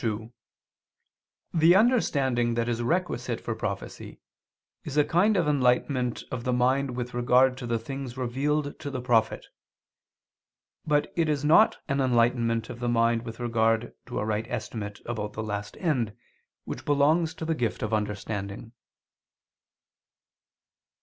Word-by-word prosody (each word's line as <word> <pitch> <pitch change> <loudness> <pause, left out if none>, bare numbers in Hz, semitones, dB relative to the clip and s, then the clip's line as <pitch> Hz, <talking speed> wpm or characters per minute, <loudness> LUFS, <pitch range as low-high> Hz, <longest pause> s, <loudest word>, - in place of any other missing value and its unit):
2: 110 0 -3 1.2
The 165 +1 +5
understanding 135 - +2
that 115 0 0
is 120 -1 -1
requisite 175 +9 -1
for - - -3
prophecy, - - -6 0.6
is 150 -4 -5
a 150 - +5
kind 200 +5 +3
of 170 -4 +1
enlightenment 125 -2 +1
of 125 -2 -4
the 125 - 0
mind 130 +1 +1
with 125 0 -4
regard 125 +2 +4
to 125 - -5
the 115 0 +1
things 130 +2 -6
revealed 140 +4 -1
to 145 - -5
the 130 -2 -4
prophet: 115 -3 +1 1.4
but 145 -1 +1
it 165 -2 +1
is 150 -1 0
not 165 +9 +5
an 135 0 0
enlightenment 115 -2 +2
of 120 - -8
the 120 0 -1
mind 115 0 +2
with 115 0 -8
regard 115 -1 +1
to 125 - -5
a - - -1
right 110 +1 -1
estimate 110 -4 -5
about 105 -3 -4
the 110 - -4
last 105 -1 -5
end, 125 - -1 0.5
which - - -6
belongs 155 +3 +2
to 160 - -5
the 165 - +1
gift 120 -7 -2
of 110 0 -2
understanding. 105 +1 -3
125 Hz, 145 wpm, -27 LUFS, 115-145 Hz, 1.4 s, The